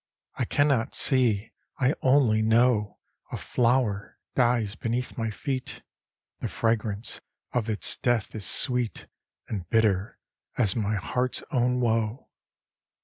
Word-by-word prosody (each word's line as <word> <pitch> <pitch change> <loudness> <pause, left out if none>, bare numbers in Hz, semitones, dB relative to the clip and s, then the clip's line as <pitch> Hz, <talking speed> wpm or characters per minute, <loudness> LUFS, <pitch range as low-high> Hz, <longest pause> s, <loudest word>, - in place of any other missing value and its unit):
I - - -2
can 145 - +2
not 130 -3 0
see, 115 -6 +2 0.3
I 135 +2 +3
only 130 -5 +4
know 110 -1 +2 0.3
A - - -3
flower 115 -4 0 0.2
dies 120 -5 +2
beneath 120 +3 -3
my 115 -1 -2
feet; 130 +4 -4 0.6
The - - -3
fragrance 110 -1 -1 0.3
of 115 -3 -1
its 105 - 0
death 120 -4 0
is 105 -3 -4
sweet 125 -4 +2 0.4
And 95 -5 -5
bitter 110 -3 +1 0.4
as 105 -6 +3
my 105 -2 0
heart's 125 - -1
own 125 -1 +1
woe. 115 +1 -1
115 Hz, 125 wpm, -26 LUFS, 105-125 Hz, 0.6 s, only